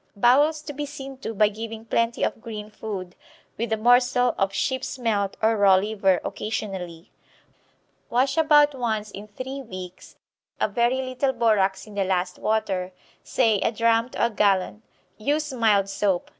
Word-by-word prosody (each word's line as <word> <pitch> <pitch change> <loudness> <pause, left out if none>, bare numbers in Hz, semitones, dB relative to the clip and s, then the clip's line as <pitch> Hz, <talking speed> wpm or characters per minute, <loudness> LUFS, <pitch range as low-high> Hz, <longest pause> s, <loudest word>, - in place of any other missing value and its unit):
Bowels 290 +8 +3
to 295 - -7
be 295 +1 -4
seen 275 -2 -9
to 225 - -5
by 215 -1 +3
giving 220 +1 -7
plenty 230 +1 0
of - - -1
green 215 -2 -7
food, 195 -5 -6 0.4
with 230 0 -3
a 220 - +2
morsel 245 +2 +3
of 195 -1 0
sheep's 260 +7 -2
melt 210 -5 -1
or 225 +1 +4
raw 200 -2 +5
liver 195 -1 +1
occasionally. 190 -6 -5 1.0
Wash 260 +3 +1
about 295 -2 +5
once 220 -5 -2
in 205 +1 -9
three 260 +6 -6
weeks, 185 -6 -10 0.4
a - - +2
very 240 +5 +1
little 260 +1 -1
borax 200 -5 +1
in 215 - -13
the 200 -1 0
last 180 -1 -1
water, 190 -4 -1 0.3
say 225 -5 +2
a - - +1
drachm 230 +1 +2
to - - 0
a 235 - -1
gallon. 200 0 +1 0.4
Use 290 +5 -1
mild 215 -5 +3
soap. 195 -2 -1
220 Hz, 160 wpm, -24 LUFS, 200-250 Hz, 1.0 s, raw